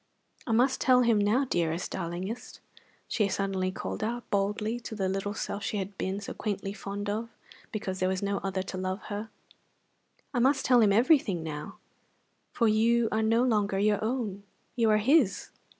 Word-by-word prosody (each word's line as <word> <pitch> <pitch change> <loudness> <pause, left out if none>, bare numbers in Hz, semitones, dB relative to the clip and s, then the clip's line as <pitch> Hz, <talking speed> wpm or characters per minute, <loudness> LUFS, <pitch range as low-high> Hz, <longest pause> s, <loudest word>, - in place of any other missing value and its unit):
I - - -1
must 250 +4 +3
tell 250 -1 +5
him 230 -3 +3
now, 215 +7 +2
dearest, 170 -6 -1
darlingest," 185 +6 -5 0.5
she 210 -3 +1
suddenly 195 -2 -1
called 190 - -5
out 240 +2 -3
boldly 210 +3 0
to 230 - -7
the 195 -3 -1
little 195 +2 -2
self 200 - -4
she 210 - -2
had 195 0 -4
been 190 +1 -2
so 200 - -6
quaintly 200 -2 -3
fond 205 0 -5
of 220 +3 -2 0.4
because 190 -3 -4
there 185 - +1
was 190 +1 -2
no 200 0 0
other 190 -1 -2
to 185 -1 -6
love 185 +2 -3
her. 210 +2 -4 1.0
"I 245 - +1
must 270 +3 +3
tell 250 -2 +5
him 210 -2 +5
everything 225 - +3
now, 150 -2 -6 0.7
for 230 - +2
you 225 +2 +3
are 220 - +1
no 225 +2 +3
longer 210 -5 +1
your 210 +1 +2
own. 220 -4 -2 0.3
You 230 -3 +3
are 215 - +5
his." 240 -1 +2
205 Hz, 180 wpm, -29 LUFS, 195-230 Hz, 1.0 s, tell